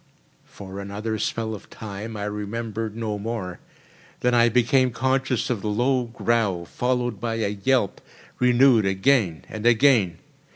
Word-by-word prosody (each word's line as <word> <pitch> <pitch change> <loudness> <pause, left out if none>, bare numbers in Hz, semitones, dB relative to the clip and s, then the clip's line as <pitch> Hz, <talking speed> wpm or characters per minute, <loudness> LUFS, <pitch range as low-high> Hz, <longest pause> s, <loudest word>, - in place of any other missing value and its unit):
For 95 0 -9
another 105 +2 -4
spell 110 +1 -2
of 105 - -10
time 110 +1 -7
I 100 - -4
remembered 105 +1 -4
no 110 -2 -3
more. 100 -4 -4 0.6
Then 125 0 +2
I 120 0 +5
became 125 +2 +3
conscious 130 0 0
of 110 -5 -2
a - - -2
low 125 +4 +1
growl, 115 -6 0
followed 125 -1 -1
by 115 -1 -1
a 110 -3 0
yelp, 105 +1 0 0.4
renewed 125 -2 +5
again 95 - +1
and 110 +1 -2
again. 115 -8 +4
115 Hz, 140 wpm, -24 LUFS, 105-125 Hz, 0.6 s, I